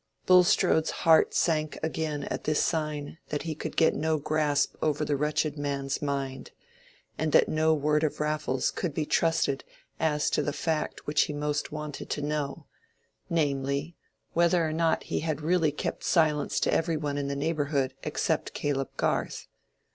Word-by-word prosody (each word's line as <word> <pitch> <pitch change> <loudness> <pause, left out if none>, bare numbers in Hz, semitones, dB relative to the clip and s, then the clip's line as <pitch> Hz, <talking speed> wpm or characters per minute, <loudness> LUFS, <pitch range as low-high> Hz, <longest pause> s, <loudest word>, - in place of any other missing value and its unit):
Bulstrode's 180 -3 +4 0.2
heart 165 -1 +5
sank 155 -2 +1
again 155 -2 -2
at - - -4
this 155 0 +2
sign 155 -1 -2
that 150 - -2
he 160 -1 -3
could 155 - -6
get 160 - +5
no 160 0 0
grasp 150 -1 +1
over 150 -1 +1
the 145 - 0
wretched 150 +1 0
man's 140 -1 -2
mind, 140 -2 -3 0.7
and 155 0 0
that - - +6
no 155 0 +2
word 150 +1 +1
of 155 - -1
Raffles 150 -3 0
could 165 -6 -3
be 155 - 0
trusted 165 -4 +1 0.4
as 150 -2 +1
to - - +2
the 145 - -2
fact 160 -1 -2
which 150 0 +3
he 150 - -5
most 150 0 -2
wanted 150 -1 -6
to 150 - -2
know, 145 -2 -3 0.6
namely, 140 0 -1 0.4
whether 170 0 +3
or 155 - -2
not 165 0 +1
he - - -2
had 155 -2 -2
really 165 -1 +2
kept 150 - -4
silence 155 -4 +2
to - - +2
every 165 -1 +1
one 145 -2 -2
in 140 - -2
the 140 - -2
neighborhood 140 -2 0
except - - -1
Caleb 135 -2 -1
Garth. - - -1
150 Hz, 165 wpm, -28 LUFS, 145-160 Hz, 0.7 s, that